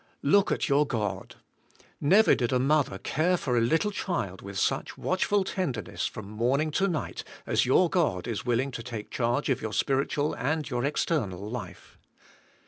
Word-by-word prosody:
Look 195 Hz, +8 st, +4 dB
at -, -, 0 dB
your 145 Hz, 0 st, +3 dB
God. 105 Hz, -7 st, -3 dB, 0.6 s
Never 195 Hz, +9 st, +5 dB
did 120 Hz, -2 st, 0 dB
a 130 Hz, -, +3 dB
mother 135 Hz, -5 st, +2 dB
care 170 Hz, -, +1 dB
for 125 Hz, -7 st, -1 dB
a 120 Hz, -, +3 dB
little 160 Hz, -, +2 dB
child 115 Hz, -, -3 dB
with 100 Hz, 0 st, -7 dB
such -, -, -1 dB
watchful 195 Hz, +2 st, +1 dB
tenderness 165 Hz, -, -3 dB
from 105 Hz, -2 st, -8 dB
morning 125 Hz, +9 st, 0 dB
to 190 Hz, +6 st, +1 dB
night 155 Hz, -, -3 dB, 0.2 s
as -, -, +1 dB
your 175 Hz, +8 st, +5 dB
God 155 Hz, -, 0 dB
is 115 Hz, -4 st, -3 dB
willing 125 Hz, +3 st, 0 dB
to 115 Hz, -, -6 dB
take 115 Hz, -3 st, -7 dB
charge 120 Hz, +4 st, 0 dB
of 130 Hz, -, +1 dB
your 110 Hz, -1 st, -4 dB
spiritual 140 Hz, +2 st, 0 dB
and 150 Hz, +4 st, -1 dB
your 120 Hz, -3 st, -2 dB
external 110 Hz, -, -1 dB
life. 110 Hz, -5 st, -8 dB
135 Hz, 170 wpm, -28 LUFS, 115-155 Hz, 0.6 s, Never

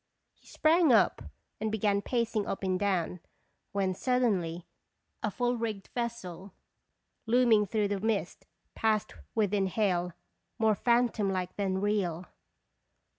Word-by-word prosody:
1 -, -, -34 dB
He -, -, -24 dB
sprang 320 Hz, -1 st, +3 dB
up 230 Hz, -, +4 dB, 0.4 s
and 220 Hz, 0 st, -1 dB
began 205 Hz, -2 st, +1 dB
pacing 230 Hz, -2 st, -1 dB
up 195 Hz, -, -4 dB
and 185 Hz, -1 st, 0 dB
down, 185 Hz, -3 st, 0 dB, 0.5 s
when 195 Hz, -2 st, 0 dB
suddenly 185 Hz, -8 st, 0 dB, 0.6 s
a 215 Hz, -, 0 dB
full 245 Hz, +4 st, 0 dB
rigged 215 Hz, -4 st, -4 dB
vessel, 200 Hz, -6 st, -5 dB, 0.7 s
looming 225 Hz, -3 st, +4 dB
through 210 Hz, 0 st, 0 dB
the 200 Hz, -1 st, -1 dB
mist, 215 Hz, 0 st, -2 dB, 0.3 s
passed 215 Hz, -2 st, 0 dB, 0.2 s
within 205 Hz, -3 st, +2 dB
hail, 180 Hz, -3 st, 0 dB, 0.4 s
more 220 Hz, -2 st, +3 dB
phantom 235 Hz, -2 st, +2 dB
like 185 Hz, -1 st, -3 dB
than 190 Hz, -2 st, -1 dB
real. 190 Hz, -5 st, 0 dB
205 Hz, 125 wpm, -30 LUFS, 190-230 Hz, 0.7 s, up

